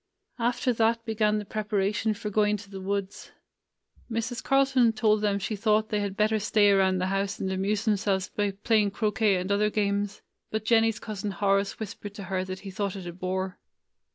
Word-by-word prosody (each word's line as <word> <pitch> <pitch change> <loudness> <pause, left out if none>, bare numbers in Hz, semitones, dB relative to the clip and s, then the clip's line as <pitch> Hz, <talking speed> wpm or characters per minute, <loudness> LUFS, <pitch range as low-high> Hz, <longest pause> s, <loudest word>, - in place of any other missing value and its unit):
After 245 +1 +1
that 230 0 +1
began 215 -2 +1
the 210 - -4
prepara 210 -1 -1
tion 215 0 0
for 210 0 -5
going 210 0 +2
to 200 -1 -13
the 195 -1 -7
woods. 200 0 -4 0.8
Mrs. 230 +2 -3
Carlton 270 -4 +3
told 215 -1 +2
them 205 -1 +1
she 200 +2 -3
thought 215 +1 +2
they 210 - 0
had 200 -1 -3
better 215 +1 +2
stay 205 -1 +4
around 190 -1 +3
the 185 - 0
house 195 +1 -1
and 190 - -2
amuse 200 +3 -1
themselves 200 -3 +1
by 205 -1 -1
playing 205 +1 +1
croquet 210 0 +1
and 185 +2 -2
other 210 +1 +3
games; 205 -1 -1 0.3
but 220 0 -3
Jennie's 225 -1 +3
cousin 210 -2 -5
Horace 200 +1 0
whispered 205 -1 -7
to 200 - -7
her 185 -1 -2
that 185 0 -6
he 195 - -7
thought 200 0 -2
it 190 -2 -7
a 175 - -6
bore. 185 +1 -3
205 Hz, 195 wpm, -27 LUFS, 195-220 Hz, 0.8 s, stay